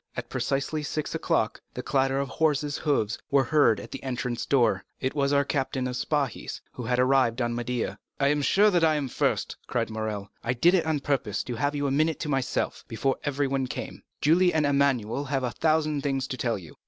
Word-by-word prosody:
At - - -4
precisely 140 +3 -1
six 150 +1 -3
o'clock - - 0
the - - -4
clatter 135 0 +1
of 140 - -1
horses' 150 -1 0
hoofs 135 -8 0
was 140 -2 +3
heard 145 -9 +4
at - - -10
the 135 - -6
entrance 125 -2 -3
door; 115 -8 +3 0.2
it 130 - -1
was 140 -1 +1
our 140 0 +3
captain 135 -2 -1
of 125 - -4
Spahis, 140 -2 -2
who - - -8
had 125 +2 +1
arrived 130 -2 +3
on 120 -1 0
Médéah. 120 0 -2 0.2
"I 140 0 +3
am 150 0 +2
sure 200 +6 +4
I 155 -1 +4
am 145 -2 -1
the 125 - -8
first," - - 0
cried - - -1
Morrel; 110 -2 -4
"I 120 - 0
did 170 +9 +4
it 175 -4 +2
on 155 -3 0
purpose 130 -8 -1
to 125 - -5
have 145 +5 -1
you 145 0 -1
a 140 - +1
minute 155 +2 +1
to 155 - -3
myself, 135 -3 -1
before 135 +4 -1
everyone 135 -2 0
came. - - -6 0.2
Julie 175 +4 +4
and 155 -2 +3
Emmanuel 140 -3 +1
have 135 -1 -1
a 125 - -1
thousand 155 +1 +1
things 135 -2 -1
to - - -2
tell 115 -4 0
you. 85 -5 -12
135 Hz, 215 wpm, -27 LUFS, 125-145 Hz, 0.2 s, heard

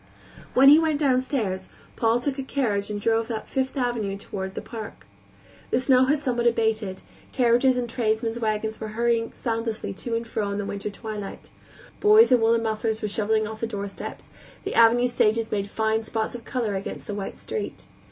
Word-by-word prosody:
When 270 +2 +8
he 300 +2 +9
went 315 -3 +1
downstairs 255 -9 0 0.3
Paul 230 +1 +2
took 275 +2 -2
a - - -2
carriage 215 -8 -1
and 210 -1 -3
drove 225 +2 +1
up 220 -2 -4
Fifth 265 +1 -2
Avenue 235 -6 -1
toward 190 -1 -6
the - - -2
Park. 215 - -8 0.6
The - - +2
snow 255 0 +4
had 290 +3 +2
somewhat 245 -4 0
abated; 220 -4 0 0.3
carriages 250 +1 +3
and 245 -1 -1
tradesmen's 225 -1 -1
wagons 220 0 -2
were 215 0 -6
hurrying 235 -1 +1
soundlessly 225 -3 -3
to 230 +4 -4
and 230 0 -2
fro 210 -2 -2
in 200 - -2
the 205 - -2
winter 200 +1 -4
twilight; 210 -1 -7 0.5
boys 425 - +6
in 250 -2 +5
woolen 230 0 +3
mufflers 220 0 -1
were 210 - 0
shoveling 215 +1 +1
off 220 0 -7
the 230 - 0
doorsteps; 200 -2 -7 0.3
the - - -3
avenue 235 +2 +5
stages 225 -2 +1
made 200 -1 -1
fine 220 +1 0
spots 220 0 -3
of 235 -2 -8
color 235 -6 -2
against 195 0 -5
the 210 - -5
white 200 -1 -5
street. 445 - -5
225 Hz, 185 wpm, -25 LUFS, 215-245 Hz, 0.6 s, he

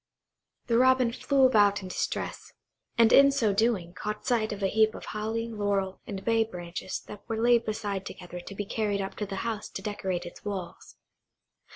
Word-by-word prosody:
The 235 -1 +2
Robin 255 -2 +4
flew 275 +1 +3
about 205 -5 +4
in - - -6
distress, - - -3 0.4
and 230 -1 +6
in 275 0 +8
so 235 -7 +1
doing 200 -5 +1
caught 210 +2 -5
sight 230 -4 +1
of 205 -1 -5
a - - +4
heap 220 +2 +3
of - - -8
holly, 220 +2 -3
laurel, 200 -3 -1
and 195 -2 -6
bay 225 -1 +3
branches 180 -3 -6
that 210 - -10
were 225 - -1
laid 235 0 +4
aside 205 -3 -3
together 180 -1 -8
to 195 +3 -9
be 205 - -3
carried 205 -1 -1
up 195 0 -4
to 210 - -3
the 195 - -5
house 220 -2 -3
to 195 - -7
decorate 190 -4 -3
its 175 - -10
walls. 195 -4 -6
210 Hz, 190 wpm, -28 LUFS, 195-230 Hz, 0.4 s, in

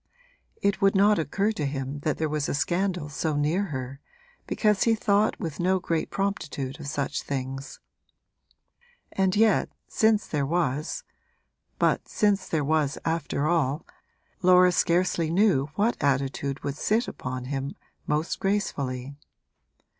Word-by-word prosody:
It 200 0 +1
would 195 0 +4
not 205 +1 +5
occur 195 +8 0
to 185 -9 -4
him 135 0 -4
that 150 +1 -1
there 160 - 0
was 150 -1 -1
a - - 0
scandal 175 +1 0
so 150 +1 -2
near 155 +7 +1
her, 130 -5 -5 0.5
because 210 -3 +2
he 230 -1 +4
thought 210 0 +2
with 165 -7 -5
no 185 +2 +2
great 165 -3 -2
promptitude 150 -8 -3
of 150 - -7
such 140 -1 -2
things; 135 0 -5 1.3
and 190 -1 +1
yet, 215 0 +3 0.2
since 220 -2 +2
there 150 -2 -1
was 150 -1 -1 0.7
but - - +1
since 200 -3 +1
there 155 -3 0
was 150 -1 +1
after 160 -3 -1
all 155 -3 +1 0.6
Laura 180 0 +6
scarcely 170 -2 +1
knew 170 -6 +3
what 220 -3 0
attitude 140 0 0
would 140 0 -3
sit 220 +8 +1
upon 125 0 -5
him 135 +1 -3 0.3
most 150 +3 -1
gracefully. 140 -10 -1
160 Hz, 140 wpm, -26 LUFS, 140-195 Hz, 1.3 s, Laura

